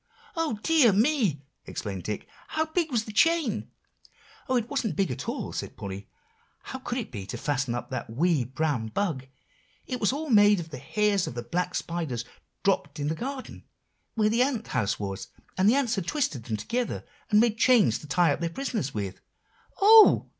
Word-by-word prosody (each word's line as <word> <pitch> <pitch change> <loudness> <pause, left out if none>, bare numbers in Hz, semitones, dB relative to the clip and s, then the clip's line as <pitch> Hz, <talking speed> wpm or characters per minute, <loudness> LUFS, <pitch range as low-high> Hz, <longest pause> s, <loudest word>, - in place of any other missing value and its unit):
"Oh, 320 -10 -1
dear 310 -9 +5
me!" 210 - +2 0.2
exclaimed 95 -3 -5
Dick; 105 -1 -4 0.2
"how 315 0 0
big 320 0 -1
was 225 -3 0
the 215 - -7
chain?" 300 0 +2 0.8
"Oh! 260 - +2
it 235 -2 +1
wasn't 250 -5 -2
big 195 -8 +1
at 125 - -4
all," - - -4
said - - -5
Polly; 100 0 -7 0.5
"how 260 - -7
could 245 -1 -4
it 240 - -4
be, 100 -5 -6
to 120 - -5
fasten 135 -2 -1
up 120 - -6
that 130 - -4
wee 150 +4 +2
brown 130 -2 -1
bug? 130 - -2 0.6
It 250 -1 -4
was 210 - +2
all 295 +1 -3
made 205 -2 +6
of 160 -1 -7
the 150 - -6
hairs 205 +6 +1
of - - -6
the 120 - -4
black 180 +9 -2
spiders 155 -9 -3 0.4
dropped 150 -7 0
in 145 +1 -1
the - - 0
garden, 260 - -6 0.5
where 215 -2 +3
the 230 +3 +2
ant 255 -4 0
house 110 -6 0
was; 100 0 -4 0.3
and 190 +2 +4
the 240 - +4
ants 265 -5 +1
had 195 -6 -2
twisted 170 - -1
them 110 -2 -2
together, 240 - -3 0.2
and 210 -1 +5
made 225 -1 +2
chains 225 - +4
to 150 - -11
tie 170 0 +3
up - - -5
their 170 -1 -1
prisoners 205 - -3
with." 100 -2 -4 0.6
"Oh!" 435 +1 +8
195 Hz, 195 wpm, -27 LUFS, -, 0.8 s, Oh